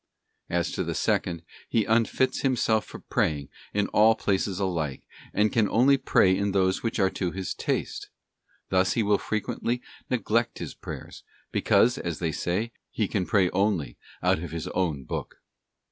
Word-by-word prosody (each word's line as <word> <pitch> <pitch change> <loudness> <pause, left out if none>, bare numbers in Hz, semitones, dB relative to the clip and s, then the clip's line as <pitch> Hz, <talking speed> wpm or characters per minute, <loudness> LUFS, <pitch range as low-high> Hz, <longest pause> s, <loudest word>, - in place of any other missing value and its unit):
} - - -48
As 85 - -1
to - - -2
the - - -3
second, 85 -1 0 0.3
he 110 -3 +2
unfits 115 +3 +2
himself 115 -5 +2
for - - -9
praying 70 -3 -1 0.2
in 105 0 +1
all 110 +1 +5
places 95 -2 0
alike, 85 -8 -2 0.3
and 105 - +2
he - - -13
can 110 -4 +3
only 130 +4 +5
pray 95 -8 +3
in. 100 0 0
those 95 -1 +2
which 115 - -2
are 95 -3 +3
to 90 - -2
his 95 +1 -4
taste. - - -3 0.6
Thus 95 0 +3
he 115 - +1
will 105 -1 +3
frequently 110 +3 -2 0.3
neglect 115 0 +1
his - - -6
prayers, - - -8 0.3
because, 125 +2 +3
as 85 -3 -3
they 85 -2 -1
say, 95 +9 -1 0.2
he 110 - -1
can 95 -3 -1
pray 95 -4 +3
only 90 - 0 0.3
out - - +3
of 85 - -5
his 85 +1 -5
own 80 -8 -1
book. - - -5
100 Hz, 175 wpm, -27 LUFS, 90-110 Hz, 0.6 s, all